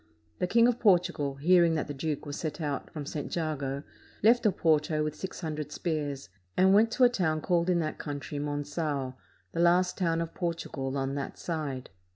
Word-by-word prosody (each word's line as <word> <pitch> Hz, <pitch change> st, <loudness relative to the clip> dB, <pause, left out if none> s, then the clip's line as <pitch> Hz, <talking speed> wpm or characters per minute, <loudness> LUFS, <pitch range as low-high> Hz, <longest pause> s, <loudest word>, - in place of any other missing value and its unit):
The 180 Hz, -, +1 dB
King 230 Hz, +5 st, +5 dB
of 245 Hz, -1 st, +1 dB
Portugal, 175 Hz, -8 st, +2 dB
hearing 170 Hz, +3 st, +4 dB
that 155 Hz, -, -1 dB
the 145 Hz, -, -5 dB
duke 150 Hz, +1 st, -3 dB
was 145 Hz, -1 st, -5 dB
set 155 Hz, -1 st, -4 dB
out 145 Hz, -3 st, -3 dB
from 150 Hz, -2 st, -6 dB
St. 145 Hz, 0 st, -4 dB
Jago, 140 Hz, -4 st, -2 dB, 0.4 s
left 235 Hz, +2 st, +5 dB
Oporto 155 Hz, -4 st, +2 dB
with 150 Hz, -1 st, -2 dB
six 190 Hz, +4 st, -7 dB
hundred 155 Hz, -3 st, -4 dB
spears, 145 Hz, -, -3 dB, 0.3 s
and 190 Hz, +1 st, +6 dB
went 220 Hz, +3 st, +5 dB
to 255 Hz, -, +3 dB
a -, -, +10 dB
town 170 Hz, -9 st, 0 dB
called 170 Hz, +2 st, +1 dB
in 180 Hz, -, +3 dB
that 155 Hz, -1 st, -3 dB
country 145 Hz, 0 st, -5 dB
Mongao, 145 Hz, -2 st, -2 dB, 0.4 s
the 165 Hz, -, -4 dB
last 180 Hz, +2 st, +3 dB
town 165 Hz, -3 st, +1 dB
of 165 Hz, -1 st, -3 dB
Portugal 150 Hz, -6 st, -3 dB
on 135 Hz, 0 st, -1 dB
that 140 Hz, -1 st, -4 dB
side. 145 Hz, -, -4 dB
155 Hz, 190 wpm, -29 LUFS, 145-175 Hz, 0.4 s, a